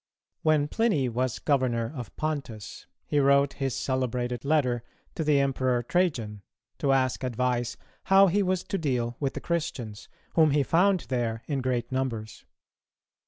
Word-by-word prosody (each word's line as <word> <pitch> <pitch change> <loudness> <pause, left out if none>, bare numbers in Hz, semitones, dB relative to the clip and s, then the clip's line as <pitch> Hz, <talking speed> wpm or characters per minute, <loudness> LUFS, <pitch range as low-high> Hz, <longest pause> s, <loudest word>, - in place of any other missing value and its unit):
When 155 -2 +3
Pliny 160 - +1
was 125 +1 -1
Governor 130 -4 0
of 125 -3 -7
Pontus, 140 -9 -5 0.2
he 145 - +1
wrote 140 0 +4
his 135 -3 -2
celebrated 125 -2 -2
letter 140 -5 +1 0.3
to 160 - -2
the 150 -2 +3
Emperor 130 -3 +1
Trajan, 120 - 0 0.4
to 140 - +2
ask 130 -1 +1
advice 125 0 -1 0.3
how 195 +1 +7
he 195 +2 +2
was 185 -2 0
to 195 0 -3
deal 125 -6 -1
with 140 -2 -2
the - - -4
Christians, 120 -11 -3 0.2
whom 160 -2 +5
he 145 0 +3
found 180 +5 +3
there 120 -2 -1
in 140 -3 -2
great 125 -1 -1
numbers. 120 -5 -3
135 Hz, 150 wpm, -27 LUFS, 120-155 Hz, 0.4 s, how